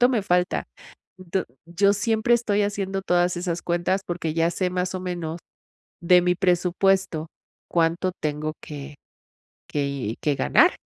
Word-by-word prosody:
cuánto 245 - +6
me 235 -6 +1
falta. 180 -1 +1 0.5
D 185 +1 -2 0.2
yo 200 +4 +3
siempre 225 +2 +2
estoy 210 -3 +1
haciendo 195 -1 -2
todas 175 -1 +2
esas 175 -1 -3
cuentas 175 +3 0
porque 165 -3 -3
ya 165 0 +2
sé 180 +1 -1
más 180 0 -2
o 185 - -3
menos, 175 -3 -4 0.6
de 180 +1 +6
mi 180 0 +2
presupuesto, 180 -2 +1 0.4
cuánto 170 +2 +1
tengo 155 0 -2
que 145 -1 -8 0.7
que 140 -6 -2
que 145 -2 +2
ganar 130 - +4
180 Hz, 145 wpm, -24 LUFS, 165-195 Hz, 0.7 s, cuánto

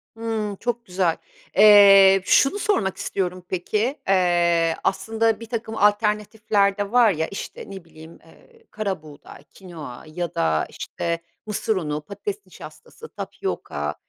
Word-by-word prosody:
Hıı, 220 -3 -3
çok 240 -1 -3
güzel. 180 -4 0 0.4
Eee, 195 -2 +8
şunu 275 - +3
sormak 310 - 0
istiyorum, 180 -1 -3
peki, 215 - -2
eee, 175 -3 +2
aslında 220 +2 0
birtakım 230 -1 -5
alternatifler 210 -1 +1
de 205 -1 -3
var 240 -3 +5
ya, 160 -1 -2
işte, 195 - -8
ne 190 -3 -9
bileyim, 160 0 -15
eee, 460 -1 -22
karabuğday, 155 -9 -7
kinoa 165 -8 -11
ya 170 +1 -5
da, 80 -1 +1
işte, 170 -1 -4 0.3
mısır 215 +1 -1
unu, 150 -5 -3
patates 200 +3 -7
nişastası, 185 - -13
tapyoka, 75 +1 -5
195 Hz, 125 wpm, -23 LUFS, 170-215 Hz, 0.4 s, Eee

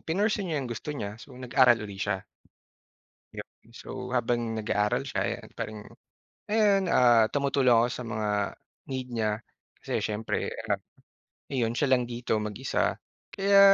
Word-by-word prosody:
pinursue 200 +3 0
niya 160 - -1
yung 120 - -6
gusto 115 - -7
niya, 105 0 -5
so 125 +1 -12
nag-aral 125 -1 +5
uli 100 -2 -8
siya. 95 -2 -1 1.1
Yup - - -7 0.2
and 115 - -21
so, - - -10 0.2
habang 120 -1 0
nag-aaral 105 -1 0
siya, - - -3
eh, - - 0
yan, - - -13
parang 110 0 -4 0.7
ayan, 205 -3 +4
ah, 120 -3 +6
tumutulong 140 -3 +3
ako 115 +1 +5
sa 125 - -5
mga 110 -2 -2 0.6
need 130 -1 -3
niya. 110 -3 0 0.5
Kasi - - -2
siyempre, 105 +1 -2 0.2
ah, - - +3 0.7
ayon, 120 -4 0
siya 140 +1 +1
lang 125 -2 +3
dito, 120 -2 -1
mag-isa. 105 -2 -1 0.4
Kaya 200 0 +5
120 Hz, 155 wpm, -28 LUFS, 110-135 Hz, 1.1 s, ah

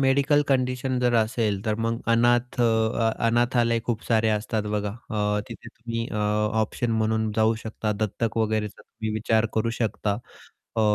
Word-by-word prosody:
Medical 140 +2 +3
condition 130 -1 0
जर 125 -1 +2
असेल, 110 -3 +1
तर 110 - +1
मग 115 0 -1
अनाथ 120 +1 +2
अ, 115 0 +2 0.2
अनाथालय 120 0 +2
खूप 115 -2 -1
सारे 110 -1 +2
असतात 110 0 0
बघा. 105 -1 -1 0.2
अ, 105 -1 0
तिथे 115 - -9
तुम्ही 115 0 -5
अ, - - -7 0.5
ऑप्शन 115 +2 -1
म्हणून 110 0 +1
जाऊ 110 +1 +3
शकता, 110 -1 -2
दत्तक 110 +2 -2
वगैरेचा 110 -1 -1
तुम्ही 110 -1 -6
विचार 110 +1 +2
करू 110 +1 +1
शकता. 105 -2 -1 0.6
अ - - +2
115 Hz, 155 wpm, -25 LUFS, 110-120 Hz, 0.6 s, Medical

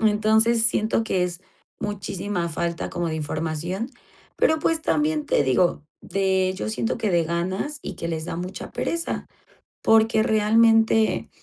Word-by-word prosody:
Entonces, 220 +2 +3
siento 225 -1 +1
que 185 -4 +1
es 175 -1 -5 0.4
muchísima 195 -3 -3
falta 170 +1 -3
como 175 -1 -2
de 160 - -3
información. 160 - -3 0.5
Pero, 315 0 +3
pues, 320 +1 0
también 300 0 0
te - - +2
digo 145 +3 +2 0.2
de 190 -1 +1
yo - - -3
siento 225 +2 -2
que 215 -3 0
de 170 -2 +2
ganas 185 - -2
y - - -6
que - - -4
les 160 -1 -3
da 165 - -4
mucha 180 +2 -6
pereza. 335 0 -2 0.6
Porque 220 0 +4
realmente 225 +1 +3
205 Hz, 145 wpm, -24 LUFS, 170-225 Hz, 0.6 s, Porque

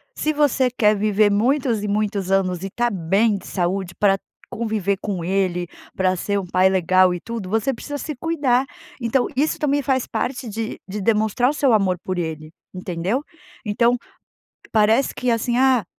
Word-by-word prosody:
se 310 - 0
você 285 -3 +2
quer 215 -3 +2
viver 210 0 +2
muitos 240 +1 +1
e - - -2
muitos 205 -2 -1
anos 185 -2 +1
e - - -2
estar 240 +5 -1
bem 200 +4 +1
de 190 - -11
saúde 180 0 -2
pra 195 -2 +4 0.3
conviver 215 -4 -1
com 190 -5 -3
ele, 180 -2 0 0.3
pra 185 -1 +1
ser 200 +3 -1
um 195 - -5
pai 185 +1 +3
legal 185 0 +3
e - - -5
tudo, 225 -2 -6
você 225 +6 0
precisa 290 +4 -6
se 305 +1 -5
cuidar. 275 -4 +1 0.4
Então 245 +2 +1
isso 295 +4 +1
também 290 -1 +1
faz 260 -1 0
parte 255 -1 -3
de 220 +1 -4
de 205 +2 -5
demonstrar 220 +4 +2
o - - -1
seu 275 -4 +2
amor 195 -4 +2
por 185 -1 -3
ele, 155 -2 -5 0.2
entendeu? 185 - -2 0.4
Então, 235 +4 +2 0.8
parece 220 +4 +3
que, 250 0 -1
assim, 235 +1 0
"ah, 260 -4 +4
210 Hz, 175 wpm, -21 LUFS, 190-245 Hz, 0.8 s, pra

